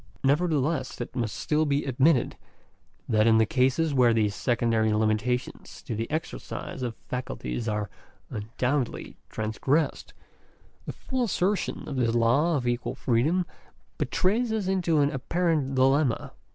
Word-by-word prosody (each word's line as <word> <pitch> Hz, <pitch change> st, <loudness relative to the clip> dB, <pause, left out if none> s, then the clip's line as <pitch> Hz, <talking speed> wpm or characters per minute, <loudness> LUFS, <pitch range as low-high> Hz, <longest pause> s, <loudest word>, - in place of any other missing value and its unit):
Nevertheless, 150 Hz, +1 st, +1 dB
it 120 Hz, 0 st, -6 dB
must 115 Hz, -4 st, -2 dB
still 150 Hz, +1 st, +1 dB
be 145 Hz, -1 st, 0 dB
admitted, 135 Hz, +1 st, +2 dB, 0.7 s
that 110 Hz, -1 st, +3 dB
in 110 Hz, -1 st, +5 dB
cases 135 Hz, +7 st, +1 dB
where 125 Hz, -3 st, +4 dB
these 105 Hz, -2 st, +2 dB
secondary 115 Hz, -2 st, +1 dB
limitations 110 Hz, +3 st, -1 dB
to -, -, -4 dB
the 115 Hz, +1 st, -3 dB
exercise 150 Hz, -, -5 dB
of 120 Hz, -3 st, -3 dB
faculties 115 Hz, -, -4 dB
are 105 Hz, -1 st, -1 dB, 0.4 s
un 105 Hz, 0 st, -5 dB
doubtedly 130 Hz, -1 st, -1 dB
transgressed, 130 Hz, +8 st, -1 dB, 0.7 s
the -, -, -2 dB
full 260 Hz, -2 st, -2 dB
assertion 195 Hz, -2 st, -1 dB
of 140 Hz, -, -4 dB
this 120 Hz, -2 st, +1 dB
law 135 Hz, +9 st, +3 dB
of 125 Hz, -3 st, -3 dB
equal 120 Hz, 0 st, -1 dB
freedom 150 Hz, +10 st, +1 dB, 0.5 s
betrays 220 Hz, +5 st, +1 dB
us 220 Hz, -3 st, -1 dB
into 175 Hz, -5 st, +2 dB
an 140 Hz, 0 st, +2 dB
apparent 150 Hz, 0 st, 0 dB
dilemma. 135 Hz, 0 st, +2 dB
130 Hz, 135 wpm, -27 LUFS, 115-155 Hz, 0.7 s, in